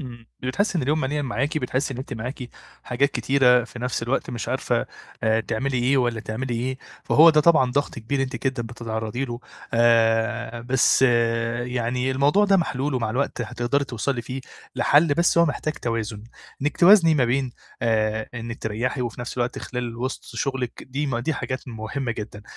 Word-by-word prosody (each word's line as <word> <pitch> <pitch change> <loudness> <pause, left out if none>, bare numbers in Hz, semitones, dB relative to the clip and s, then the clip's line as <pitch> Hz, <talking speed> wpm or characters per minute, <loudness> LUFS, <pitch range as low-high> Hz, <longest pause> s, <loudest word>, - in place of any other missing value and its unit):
إمم. 120 -4 -9
بتحسّي 180 +8 0
إن - - -1
اليوم 150 +4 +1
مليان 145 +1 -1
معاكِ، 140 +4 -1
بتحسّي 130 0 -2
إن - - -7
أنت 135 +1 -6
معاكِ 125 +2 -6 0.3
حاجات 140 +4 +1
كتيرة 125 -3 +3
في 120 - -11
نَفْس 125 -1 -2
الوقت 125 +2 -1
مش 120 -2 -5
عارفة، - - 0 0.4
آآ 110 0 +3
تعملي 125 +5 -2
إيه 130 +3 +2
والّا 120 -3 +1
تعملي 120 +3 -4
إيه، 130 +3 -2 0.3
فهو 165 +2 +7
ده 155 -1 +4
طبعًا 150 -6 +4
ضَغْط 145 +2 -1
كبير 135 +5 -1
أنتِ 135 +1 -5
جدًا 130 -3 -1
بتتعرّضي 115 +1 -4
له. 120 -1 -6 0.3
آآ 115 0 +2
بس 130 +2 +3 0.6
يعني 125 +1 -1
الموضوع 145 +10 +3
ده 200 -1 +4
محلول 145 -4 -1
ومع 115 -3 -1
الوقت 130 +1 -1
هتقدري 120 +5 -1
توصلي 120 +1 -2
فيه 130 +3 -5 0.4
لحَل، 145 +1 +4
بس 170 +1 +3
هو 170 - +7
محتاج 155 +1 -2
توازن، 110 -2 -3 0.4
إنِّك 145 -1 -1
توازني 175 -3 +7
ما 135 -4 +3
بين 125 +1 0 0.3
آآ 110 -1 +1
إنِّك 115 0 -6
تريّحي 120 +5 -2
وفي 120 0 -5
نَفْس 120 - -6
الوقت 120 0 -1
خلال 120 -2 -5
وِسط 130 +2 -4
شُغلِك، 130 -3 -3
دي 140 +3 -3
م 120 -3 -1
دي 140 +5 -1
حاجات 130 +1 -4
مهمة 115 +3 -4
جدًا. 105 -1 -7
125 Hz, 180 wpm, -24 LUFS, 115-140 Hz, 0.6 s, فهو